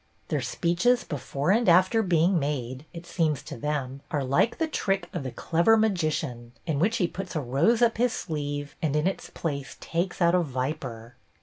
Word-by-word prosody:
Their - - 0
speeches 210 +9 +1
before 145 +2 -2
and 230 0 +3
after 185 +6 +5
being 175 -1 +3
made, 135 -2 -3
it 170 -1 -9
seems 160 -5 0
to - - -7
them, 135 0 -3
are 145 -3 -1
like 140 - +2
the 325 - 0
trick 195 -10 -1
of 175 - -2
the 130 - -4
clever 170 - +3
magician, 155 - -1
in 155 -5 -1
which 215 +8 +2
he 180 - +2
puts 185 0 -7
a - - +1
rose 150 - +2
up 230 -2 +3
his 245 +1 +2
sleeve 145 -7 -4
and 150 -3 0
in 150 +1 +1
its 190 - -2
place 140 -4 -4
takes 175 +2 -2
out 170 -1 +4
a 180 - +5
viper. 130 -5 -4
160 Hz, 190 wpm, -27 LUFS, 140-190 Hz, -, after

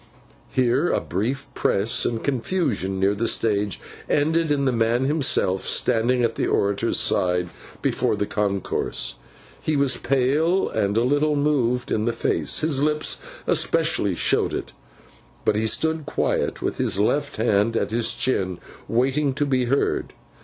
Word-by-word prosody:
Here, 130 +6 +2
a - - +2
brief 125 +10 -3
press 100 +4 +1
and 115 -1 -2
confusion 125 - -1
near 95 +1 +2
the 115 +3 -1
stage, 105 -3 0 0.3
ended 160 +2 +1
in 140 -1 +1
the 130 - +2
man 115 +1 +1
himself 135 -10 +1
standing 120 +2 +2
at 115 -1 +1
the - - -1
orator's 100 0 +1
side 90 -1 +1 0.3
before - - +1
the 105 - -1
concourse. 100 - -2 0.4
He 155 - -1
was 140 -3 +2
pale 145 +8 +1
and 105 -1 0
a 115 - +3
little 145 +4 +2
moved 130 -4 0
in 110 - 0
the 120 - 0
face—his 140 +4 0
lips 150 +1 0 0.2
especially - - +1
showed - - +1
it; - - -5 0.7
but - - +3
he 110 +1 0
stood 160 +7 0
quiet, - - -1
with - - -2
his - - 0
left 140 +8 0
hand 110 0 +1
at - - -1
his 115 0 0
chin, 95 -8 -1 0.3
waiting 135 +4 +1
to 145 +1 0
be 130 -3 +1
heard. 135 +4 0
125 Hz, 150 wpm, -23 LUFS, 105-145 Hz, 0.7 s, a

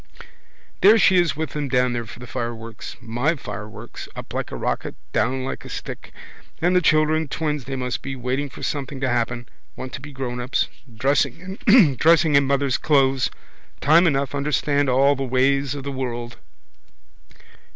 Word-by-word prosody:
There 210 +4 +8
she 190 -3 +5
is 175 -3 +2
with 155 -2 -3
them 150 -1 -3
down 125 -1 +2
there 120 -1 -3
for - - -10
the 125 - -9
fireworks. 115 -2 -6
My 120 +7 0
fireworks. 105 -5 -8
Up - - -8
like - - -3
a - - -4
rocket, - - -3 0.2
down 130 +2 0
like - - -5
a - - -10
stick. - - -7 0.5
And 175 +2 +2
the 180 - +5
children, 155 0 +3
twins 150 -2 -2
they 135 - -4
must 125 -2 -3
be, 135 0 -5
waiting 130 +3 -2
for - - -11
something 140 -2 -3
to 130 - +1
happen. 120 0 -1 0.3
Want 130 - -7
to 140 - -6
be 145 +1 -9
grownups. 125 -1 -2 0.2
Dressing 140 - -1
in 160 - +5
mother's 140 -2 +1
clothes. 135 -3 +3 0.5
Time 165 +6 +5
enough, 140 -2 0
understand 145 0 +1
all 135 +3 +4
the 135 - -3
ways 135 +2 +1
of 140 - -6
the 140 - -4
world. 120 -3 -4
135 Hz, 165 wpm, -22 LUFS, 125-150 Hz, 0.5 s, There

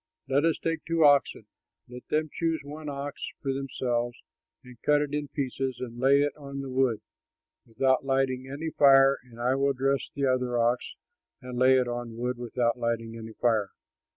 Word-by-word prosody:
Let 140 +3 +2
us 165 - +2
take 165 -1 -2
two 165 -1 +2
oxen; 140 -6 +3 0.4
let 125 0 -11
them 155 -1 0
choose 165 -1 -1
one 150 +1 -7
ox 140 +1 -6 0.2
for 135 -2 -2
themselves 120 -3 -2 0.5
and 125 -2 -15
cut 150 0 +3
it 145 -1 -2
in 150 0 -2
pieces 135 -2 -3
and 120 -2 -7
lay 135 +2 +5
it 145 - -2
on 140 -2 -7
the 135 -1 -6
wood, 130 -4 +1 0.7
without 130 +4 +1
lighting 135 -1 0
any 155 +4 -4
fire, 135 -1 +6
and 120 -2 -16
I 125 +2 +1
will 140 +1 +1
dress 135 +1 0
the 140 -1 -1
other 125 -2 +1
ox 120 +1 0 0.4
and 125 -1 -8
lay 130 +1 +5
it 125 -1 +1
on 120 -1 -5
wood, 125 +1 -2
without 120 0 -1
lighting 115 -1 -2
any 110 -1 -8
fire. 110 -3 +1
130 Hz, 180 wpm, -27 LUFS, 120-140 Hz, 0.7 s, fire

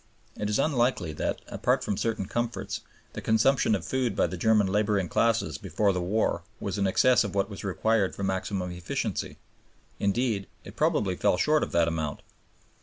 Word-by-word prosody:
It 105 - -3
is 105 - +1
unlikely 125 - +1
that, - - -2
apart - - 0
from 105 - -1
certain 110 -1 -1
comforts, 120 +3 -3 0.3
the - - -6
consumption 110 +1 +3
of 90 - -4
food 130 -3 -1
by - - +3
the - - -3
German 110 +2 +3
laboring 100 -1 +1
classes 115 -5 +1
before 100 -2 +1
the 90 - -1
war 95 -1 0 0.2
was 100 0 -3
in 100 - +2
excess 125 +6 +4
of 100 -1 -5
what 100 +1 0
was 100 - -7
required 100 +1 +1
for 100 - -5
maximum 95 -1 -2
efficiency; 90 0 -3 0.6
indeed, 100 -1 0 0.2
it - - -11
probably 95 -3 +1
fell 90 - +2
short 155 +6 +3
of - - -2
that 85 -1 +3
amount. 80 -3 -2
100 Hz, 180 wpm, -27 LUFS, 95-115 Hz, 0.6 s, excess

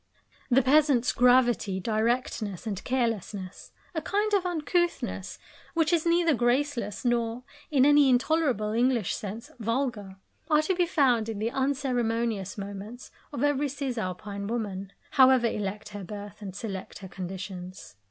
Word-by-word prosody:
The 260 +1 +4
peasant's 275 -2 +4
gravity, 245 -6 +3
directness, 220 -1 -1
and 200 -4 -4
carelessness 220 -7 -3 0.2
a 320 - -2
kind 415 +5 0
of 380 -3 +2
uncouthness 345 +1 -1 0.4
which 330 0 +2
is 340 0 +2
neither 335 -1 +4
graceless 240 -3 0
nor, 240 0 0 0.3
in 275 -3 +4
any 290 -1 +6
intolerable 255 -4 +2
English 235 -2 +1
sense, 215 +3 -7
vulgar 230 -4 -2 0.3
are 305 -1 +4
to 375 - +1
be 355 -1 +1
found 250 -9 +2
in 220 - -4
the 220 +3 -1
unceremonious 235 -7 -1
moments 200 +4 -7 0.2
of 285 -2 -3
every 290 0 +2
cisalpine 210 -7 -4
woman, 200 -4 -3 0.2
however 260 -2 +6
elect 210 -1 -3
her 205 -1 -7
birth 205 +2 -8
and 195 -3 -7
select 195 -3 -6
her 195 - -9
conditions. 185 - -7
235 Hz, 135 wpm, -27 LUFS, 205-275 Hz, 0.4 s, any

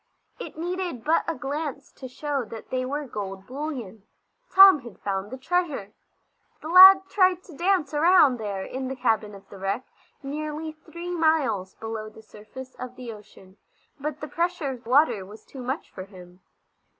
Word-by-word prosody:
It - - -8
needed 350 -7 -4
but 320 +2 +2
a 330 - -2
glance 285 -1 -5
to 260 - -10
show 280 +1 -3
that 220 0 -10
they 255 0 -1
were 290 +3 -3
gold 195 -5 -6
bullion. 255 -7 -6 0.5
Tom 385 -4 +8
had 235 -6 -12
found 195 0 -3
the 260 - -7
treasure. 295 - -2 0.7
The 310 - -8
lad 380 +2 +10
tried 370 -3 +2
to 330 - -14
dance 345 -3 +1
around 300 -4 +5
there 200 -3 -4
in 260 0 -5
the 265 - -4
cabin 220 -5 0
of 195 - -15
the 195 - -12
wreck, 195 +6 -2 0.4
nearly 305 +2 -4
three 340 +3 -9
miles 315 - +1
below 220 -1 -6
the 220 +1 -16
surface 255 +5 -12
of 255 0 -7
the 245 -3 -7
ocean, 200 -2 -16 0.4
but 300 +1 -5
the 300 - -5
pressure 335 -3 -1
of 250 -2 -10
water 245 -6 +3
was 205 +3 -13
too 265 - -10
much 260 +5 -4
for 185 - -8
him. 180 -2 -15
265 Hz, 175 wpm, -25 LUFS, 215-315 Hz, 0.7 s, lad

